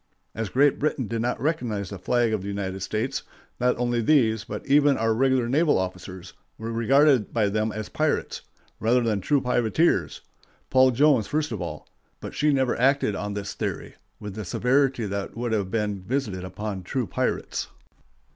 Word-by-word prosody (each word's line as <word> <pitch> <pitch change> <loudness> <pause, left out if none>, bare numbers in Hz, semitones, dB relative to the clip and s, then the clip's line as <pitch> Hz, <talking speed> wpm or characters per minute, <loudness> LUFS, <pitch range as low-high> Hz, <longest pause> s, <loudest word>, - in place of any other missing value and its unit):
As 110 -1 -3
Great 140 +6 +3
Britain 145 -3 0
did 115 +2 -2
not 120 0 -1
recognize 115 - -2
the 100 - -6
flag 120 +3 +1
of 105 - -1
the 100 - -7
United 95 -1 -3
States, 115 +7 -2 0.4
not 125 0 +2
only 120 -1 0
these, 115 -5 +3
but - - -7
even 145 0 +4
our 115 0 +1
regular 130 0 +2
naval 150 +5 +3
officers, 95 -1 -5 0.2
were 115 +1 -5
regarded 130 +1 +3
by 110 -3 +1
them 110 +2 0
as 110 -1 -5
pirates, - - -1 0.4
rather 120 +3 +3
than 110 -4 0
true 145 +6 +2
privateers—Paul 130 +1 +1
Jones 130 -3 +3
first 155 0 -1
of - - -4
all; - - -6 0.3
but - - -7
she 150 +1 +2
never 130 -3 +1
acted 135 -3 +3
on 105 +1 -4
this 100 -1 -4
theory - - -4 0.3
with 105 -2 -7
the 110 +1 -5
severity 125 +4 +1
that 100 +2 -4
would 120 0 -2
have 100 -4 0
been 105 -2 -2
visited 105 -4 -2
upon 95 +1 -5
true 125 +7 -2
pirates. - - -2
115 Hz, 175 wpm, -25 LUFS, 105-135 Hz, 0.4 s, even